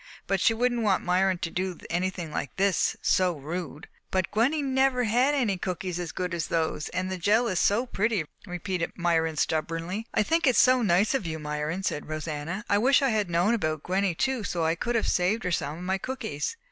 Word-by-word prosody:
But 195 -2 0
she 225 - +4
wouldn't 240 0 +1
want 205 -4 +2
Myron 185 +1 +2
to 165 -1 -4
do 185 -1 -2
anything 175 -2 -2
like 140 - -4
this, 195 -1 +2
so 185 -1 +3
rude." 160 +1 -6 0.2
"But 185 -1 -1
Gwenny 270 +8 +2
never 265 -1 +2
had 250 +6 +2
any 215 -9 0
cookies 180 -2 -3
as 175 -3 -4
good 180 +3 -3
as 170 -2 -2
those, 160 -2 -1
and 185 +1 -3
the 185 - -3
jell 215 +6 +3
is 185 -5 0
so 220 +5 +2
pretty!" 215 -7 0 0.2
repeated 180 -1 -3
Myron 165 -2 +1
stubbornly. 165 +8 -2
"I - - +2
think 325 +6 +1
it 255 - +4
is - - +2
so 255 -1 +5
nice 200 +1 +3
of 220 -10 -1
you, 160 -1 -3
Myron," 150 +4 -3
said 150 - -2
Rosanna. 155 +6 -4
"I 205 - +3
wish 265 +5 +4
I 270 - +3
had 210 -5 0
known 175 +6 +2
about 155 -8 -1
Gwenny 190 -1 0
too 260 +3 0
so 170 -3 -1
I 160 - +2
could 235 +8 -2
have 230 - +1
saved 185 +5 +1
her 180 - -1
some 150 -2 -2
of 175 - -8
my 190 +1 -1
cookies. 245 - -4
185 Hz, 215 wpm, -27 LUFS, 170-225 Hz, 0.2 s, so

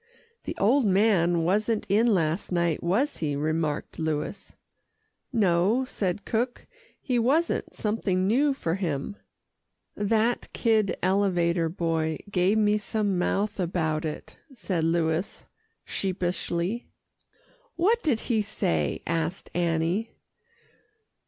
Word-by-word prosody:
"The - - -5
old 240 +4 +3
man 185 -4 +3
wasn't 210 +5 +1
in 215 +5 +3
last 170 -5 +1
night, 170 -3 +1
was 225 - 0
he?" 150 -3 -1
remarked 155 +1 -2
Louis. 160 +5 -3 0.8
"No," 210 +2 +2
said 195 -5 -3
cook, 240 +2 -2 0.3
"he 250 -3 0
wasn't 290 +9 +1
something 200 -4 0
new 270 +7 +3
for 165 -11 -2
him." 170 -1 -2 0.8
"That 220 +3 0
kid 220 -5 +2
elevator 175 -3 +2
boy 160 -2 -1
gave 190 +3 +2
me 210 0 +3
some 205 -2 -1
mouth 205 +3 0
about 165 -3 0
it," 155 -2 -6 0.2
said 175 -8 -1
Louis 165 +2 0 0.4
sheepishly. 185 +2 -2 0.9
"What 435 +7 +2
did 270 - +1
he 225 -3 +1
say?" 80 - -1
asked 165 +2 -2
Annie. 170 +5 0
190 Hz, 110 wpm, -26 LUFS, 165-220 Hz, 0.9 s, old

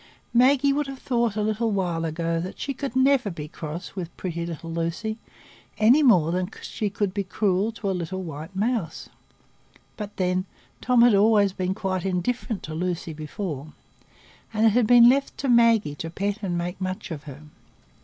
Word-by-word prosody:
Maggie 270 +3 +4
would 290 0 -1
have 270 0 -7
thought 235 -5 0
a 210 - 0
little 220 +2 0
while 175 -5 -1
ago 165 +1 -1
that 180 +3 -5
she 275 - -3
could 270 -2 -5
never 260 -3 +3
be 155 -5 -6
cross 160 +4 -7
with 175 -3 -6
pretty 170 -2 -4
little 165 0 -6
Lucy, 170 +7 -3 0.6
any 235 +8 +5
more 180 - +5
than 180 +1 -1
she 210 - -3
could 200 -1 -2
be 200 0 -1
cruel 195 +2 0
to 220 -2 -5
a - - 0
little 185 +1 -4
white 160 +3 -8
mouse; 205 -5 -2 0.9
but 210 -1 -7
then, 185 0 0 0.4
Tom 250 -2 +4
had 240 -2 +6
always 205 -1 +4
been 185 0 -2
quite 190 -3 -2
indifferent 195 +4 -2
to 155 - -6
Lucy 170 0 -3
before, 155 -1 -6 0.8
and 220 0 +2
it - - +7
had 235 0 +3
been 240 0 +8
left 275 +3 +2
to 275 - -3
Maggie 230 - +4
to 165 +3 -6
pet 200 +5 -3
and 180 -4 -2
make 175 +2 -4
much 185 -1 -4
of 150 -2 -6
her. 145 +1 -10
195 Hz, 185 wpm, -25 LUFS, 170-230 Hz, 0.9 s, been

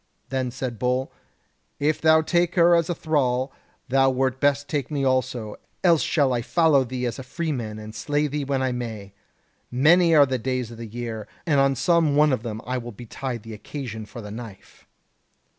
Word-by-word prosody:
Then 130 -1 -1
said 120 -2 -5
Bull: 125 +1 0 0.7
'If 150 +2 +1
thou 160 0 +5
take 175 +2 +1
her 175 -1 +6
as 170 0 +2
a 175 - 0
thrall, 135 -4 0 0.3
thou 135 +1 +4
wert 130 0 0
best 145 0 +2
take 145 -4 -2
me 145 -3 -1
also; 130 -4 -1 0.3
else 170 -4 +5
shall 140 -5 +2
I 120 - 0
follow 155 +1 +3
thee 125 0 -4
as 120 +2 -3
a - - -6
free 160 +5 -3
man 110 -6 -4
and 110 0 -9
slay 145 +5 -1
thee 150 0 -2
when 135 -1 -1
I 130 - +1
may. 110 -5 -6 0.6
Many 165 +6 +5
are 145 -2 +8
the 130 -2 -2
days 125 -1 -2
of 115 - -11
the 115 - -6
year, 115 -1 -6 0.2
and 150 -5 +3
on 135 0 +3
some 160 +2 +2
one 150 -1 +4
of 125 - -1
them 110 -1 -6
will 125 -1 -3
betide 120 +1 -6
the 115 - -8
occasion 110 -1 -7
for 120 0 -9
the 105 - -8
knife.' 110 -3 -11
130 Hz, 195 wpm, -24 LUFS, 120-150 Hz, 0.7 s, are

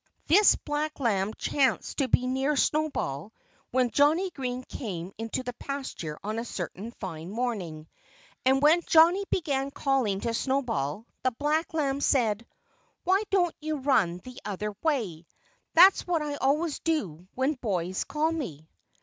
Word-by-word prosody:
This 395 +7 +6
black 300 +1 -3
lamb 210 -5 +1
chanced 275 +1 0
to 275 - +2
be 250 - +2
near 265 +3 0
Snowball 275 - -1 0.4
when 250 -1 +1
Johnnie 315 - +3
Green 255 -4 -4
came 190 -8 -6
into 225 +3 -3
the 245 -1 -5
pasture 260 - -5
on 215 +2 -2
a - - -3
certain 195 -1 -5
fine 165 -3 -6
morning. 195 -9 -3 0.6
And 265 +2 +3
when 320 +4 +6
Johnnie 340 +5 +5
began 275 -6 0
calling 265 -8 0
to 230 -1 -1
Snowball 230 - -1 0.2
the 255 - +2
black 295 +6 -1
lamb 280 -3 0
said, 230 -5 +1 0.6
"Why 380 +3 +3
don't 355 -4 +2
you 310 0 -2
run 245 -11 +2
the 255 -1 -10
other 210 +1 -4
way? 215 - -1 0.5
That's 370 +3 +7
what 335 -3 +1
I 295 -1 -3
always 295 +4 +1
do 185 - -2
when 265 +4 +1
boys 190 - -2
call 310 +2 0
me." 165 - -5
260 Hz, 150 wpm, -28 LUFS, 205-300 Hz, 0.6 s, That's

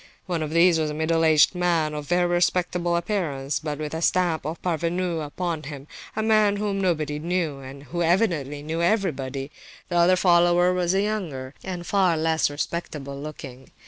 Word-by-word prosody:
One 175 -3 -2
of 155 - -2
these 170 +1 +4
was 155 -1 0
a 150 - -4
middle 165 +1 +1
aged 155 0 +5
man 170 -4 +1
of 150 -1 -6
very 175 +2 +2
respectable 175 0 +1
appearance, 165 -7 -2
but 150 -2 -4
with 150 0 -4
the 160 - -4
stamp 170 -4 +1
of 160 +2 -5
parvenu 170 0 -1
upon 165 +2 -3
him, 140 -2 -8 0.3
a 220 - -1
man 215 -2 +3
whom 200 -1 -1
nobody 155 -5 0
knew, 165 -3 -2
and 135 +1 -10
who 160 +5 -4
evidently 165 -6 +1
knew 160 +2 -3
nobody. 150 - -1 0.4
The 175 - 0
other 175 +2 +5
follower 175 0 +4
was 180 0 0
younger 185 -11 -2
and 180 -2 -5
far 190 -5 +2
less 160 0 +1
respectable 145 -2 -4
looking. 135 -4 -9
170 Hz, 175 wpm, -24 LUFS, 150-180 Hz, 0.4 s, aged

